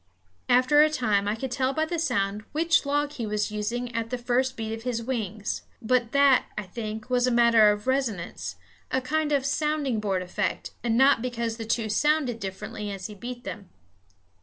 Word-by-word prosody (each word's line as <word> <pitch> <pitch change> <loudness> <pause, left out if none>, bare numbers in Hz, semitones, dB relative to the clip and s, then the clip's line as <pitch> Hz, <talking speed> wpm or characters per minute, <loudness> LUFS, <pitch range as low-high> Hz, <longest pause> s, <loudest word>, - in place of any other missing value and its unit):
After 255 +4 +5
a 310 - +6
time 215 -9 +1
I 210 - +1
could 260 +3 -5
tell 265 +1 0
by 315 +3 +1
the 335 +1 -3
sound 210 -9 0
which 325 -1 +2
log 290 +1 +1
he 235 -6 -4
was 210 0 -1
using 235 +4 -3
at 230 0 -2
the 250 - -2
first 255 +2 0
beat 220 -1 -3
of 225 - -6
his 235 -1 -2
wings; 220 -4 -3 0.2
but 240 0 +1
that, 280 -2 +5
I 210 - -2
think, 215 +3 -6
was 250 0 +3
a - - +2
matter 235 -3 +6
of 210 0 -4
resonance, 260 -9 -2 0.3
a 260 - +1
kind 300 +4 -1
of 280 -2 +2
sounding 290 -4 0
board 195 -3 -1
effect, 180 - -3
and 230 -1 +1
not 265 -2 +5
because 235 -2 -2
the 225 - -5
two 225 0 0
sounded 270 +1 +1
differently 195 +2 -5
as 195 -2 -6
he 210 - -5
beat 240 +4 -7
them. 200 -5 -7
240 Hz, 195 wpm, -26 LUFS, 215-265 Hz, 0.3 s, a